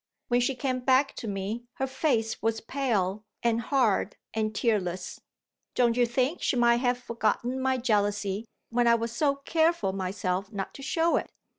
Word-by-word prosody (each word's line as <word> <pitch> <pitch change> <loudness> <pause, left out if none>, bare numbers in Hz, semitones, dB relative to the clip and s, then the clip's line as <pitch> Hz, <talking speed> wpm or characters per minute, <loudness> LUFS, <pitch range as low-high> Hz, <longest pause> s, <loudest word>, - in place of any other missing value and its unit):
When 245 0 +3
she 260 +2 +1
came 255 0 -1
back 260 +2 +3
to 230 - -5
me, 205 +4 -3
her 265 - -1
face 260 -5 0
was 225 0 0
pale 215 -6 -1 0.2
and 235 -1 +2
hard 230 -6 +1 0.2
and 215 -1 -1
tearless. 190 -6 -1 0.5
Don't 240 -2 +3
you 245 -1 +3
think 255 +7 0
she - - +1
might 235 -1 +4
have 245 0 +1
forgotten 240 +1 -1
my 260 0 +2
jealousy, 205 -3 0 0.3
when 240 0 +2
I 235 - +6
was 230 0 -2
so 280 +4 +1
careful 320 - +1
myself 190 0 -2
not 195 -3 -4
to - - -10
show 330 +5 +2
it? - - -3
235 Hz, 170 wpm, -28 LUFS, 210-260 Hz, 0.5 s, I